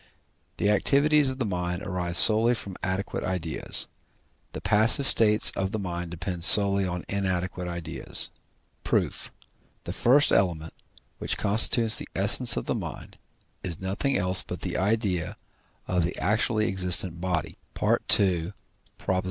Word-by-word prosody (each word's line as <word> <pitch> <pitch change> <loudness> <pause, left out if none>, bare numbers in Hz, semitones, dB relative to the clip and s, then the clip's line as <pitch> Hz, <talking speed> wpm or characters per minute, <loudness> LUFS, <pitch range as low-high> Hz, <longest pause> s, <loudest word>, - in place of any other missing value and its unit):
The 105 - 0
activities 140 +7 +1
of 130 - -7
the 130 - -3
mind 90 -1 -5
arise 90 -3 -4
solely 110 +6 +7
from 100 -4 -8
adequate 95 +2 -4
ideas; 90 -3 -2 0.7
the - - -8
passive 110 +6 +3
states 105 -4 +4
of 95 0 -4
the - - -2
mind 90 -3 -6
depend 90 0 -6
solely 100 0 +7
on 90 -1 -6
inadequate 95 -2 -4
ideas. 85 -2 -3 0.5
Proof. - - -3 0.5
The - - -7
first 140 +5 +2
element, 85 -4 -1 0.5
which - - -4
constitutes 110 +2 +3
the - - -10
essence 105 +4 +3
of - - -4
the - - -3
mind, - - -9 0.4
is 85 -3 -5
nothing 100 +9 -3
else 90 0 +1
but - - -9
the - - -5
idea 95 -4 -2 0.5
of 90 -2 -1
the 85 - -5
actually 110 +2 -1
existent 90 -3 +1
body 90 -3 -4 0.2
(II. 90 -2 0
95 Hz, 135 wpm, -24 LUFS, 90-110 Hz, 0.7 s, solely